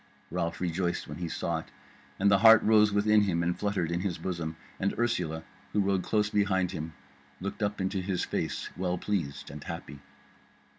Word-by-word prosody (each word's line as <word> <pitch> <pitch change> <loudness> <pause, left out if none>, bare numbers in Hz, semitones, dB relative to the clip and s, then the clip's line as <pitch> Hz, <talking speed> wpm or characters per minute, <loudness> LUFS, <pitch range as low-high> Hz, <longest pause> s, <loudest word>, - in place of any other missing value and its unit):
Ralph 85 -1 -2
rejoiced 90 0 -1
when 75 +2 -7
he 85 -2 -3
saw 85 0 -1
it, - - -10 0.5
and 100 +1 +3
the 100 - +5
heart 110 +1 +8
rose 105 -1 +5
within 105 +1 +4
him 85 -4 +1
and 85 +1 +1
fluttered 100 -5 -1
in 85 - 0
his 90 -2 -2
bosom, 85 -2 -4 0.2
and 100 - 0
Ursula, 90 -9 0 0.3
who 105 - +2
rode 100 -1 +2
close 105 +2 +1
behind 95 -3 +2
him, 80 +1 -5 0.5
looked 100 +4 -5
up 105 0 -1
into 95 0 -1
his 90 -1 -1
face - - -3
well 90 0 -1
pleased 85 -8 -3
and 75 0 -8
happy. 85 -5 -7
95 Hz, 185 wpm, -29 LUFS, 85-100 Hz, 0.5 s, heart